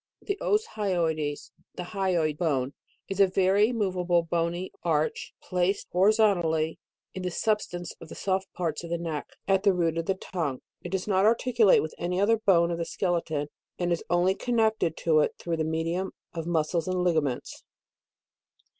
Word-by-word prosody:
The 400 -1 -3
Os 425 +1 +2
hyoides, 165 -8 -1 0.2
the 180 - -4
hyoid 175 -5 0
bone, 140 -5 0 0.3
is 195 0 -5
a 195 - +7
very 195 +4 +3
moveable 180 -6 +1
bony 170 +2 -2
arch 155 -3 -1
placed. 180 +2 0
horizontally, 180 -5 +2 0.3
in 185 - -5
the 180 - -2
substance 175 -3 -1
of 165 - -10
the - - -8
soft 190 0 -1
parts 170 -3 -2
of 170 - -7
the 170 - 0
neck, 165 -3 -4 0.2
at 195 -1 +3
the 200 -1 +4
root 165 -2 +1
of 165 - -4
the 195 - +1
tongue. 160 -8 -4 0.2
It 175 - -6
does 190 +1 -2
not 195 -1 +3
articu 235 +1 +3
late 195 - +6
with 155 - -5
any 180 +1 -1
other 220 +3 +4
bone 175 -6 +3
of 170 - -3
the 170 - -1
skeleton, 165 -6 -1 0.3
and 175 -1 -1
is 170 - 0
only 175 +2 +3
connected 220 -7 +1
to 160 -2 +5
it 150 - +1
through 170 -1 -3
the 160 - 0
medium 165 +4 -2 0.2
of 165 -1 -4
muscles 165 0 0
and 185 0 0
ligaments. 155 -8 -1
175 Hz, 175 wpm, -27 LUFS, 165-195 Hz, 0.3 s, a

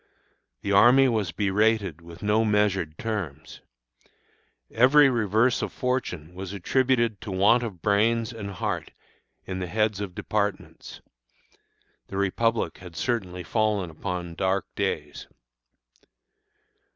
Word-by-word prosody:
The 100 - -2
army 125 +7 +6
was 110 -8 0
berated 100 -2 +1
with 85 +2 -12
no 105 +2 +2
measured 105 -7 +1
terms. 90 -10 -5 1.1
Every 135 +4 +5
reverse 115 +1 +2
of - - -3
fortune 90 -11 -3
was 95 +1 -7
attributed 120 +2 +1
to 110 - -6
a 95 - -3
want 105 +6 +5
of 100 -8 -6
brains 115 +3 +2
and 105 -3 -6
heart 95 - -4 0.5
in 95 -1 -4
the 90 - -3
heads 105 +2 0
of 95 -3 -6
departments. 105 -1 -3 1.1
The 95 - -6
Republic 100 -1 0
had 90 -2 -11
certainly 95 -7 -2
fallen 105 -3 0
upon 90 +1 -5
dark 95 +2 0
days. - - -3
100 Hz, 120 wpm, -26 LUFS, 90-115 Hz, 1.1 s, army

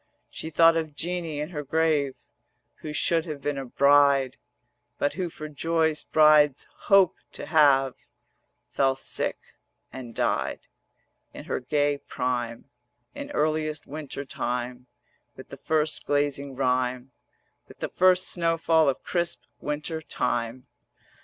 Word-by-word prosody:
She 160 - -6
thought 165 +1 +5
of 160 -3 -2
Jeanie 165 -1 -3
in 150 +2 -3
her 150 -4 -4
grave, 150 -2 +1 0.6
Who 155 - -7
should 165 +2 +1
have 150 -3 -5
been 140 0 -2
a 135 - -5
bride; 140 0 +4 0.6
But 145 - 0
who 180 +1 -3
for 155 -1 -8
joys 160 +1 0
brides 150 -3 +4 0.2
hope 195 -3 +5 0.2
to - - -5
have 135 -5 +4 0.8
Fell 135 -1 +2
sick 135 - -2 0.6
and 120 -3 -8
died - - -1 0.7
In - - -8
her - - -2
gay 145 +2 0
prime, 120 -3 -3 0.5
In - - -7
earliest 155 0 -1
Winter 145 -1 -6
time 125 0 -4 0.5
With - - -12
the - - -9
first 155 -1 -1
glazing 140 -1 -1
rime, 125 0 0 0.6
With - - -15
the - - -4
first 185 0 +3
snow 165 -1 0
fall 160 -2 +3
of 135 - -3
crisp 170 -1 -1 0.2
Winter 150 +2 -3
time. 120 -3 -2
145 Hz, 135 wpm, -26 LUFS, 135-160 Hz, 0.8 s, thought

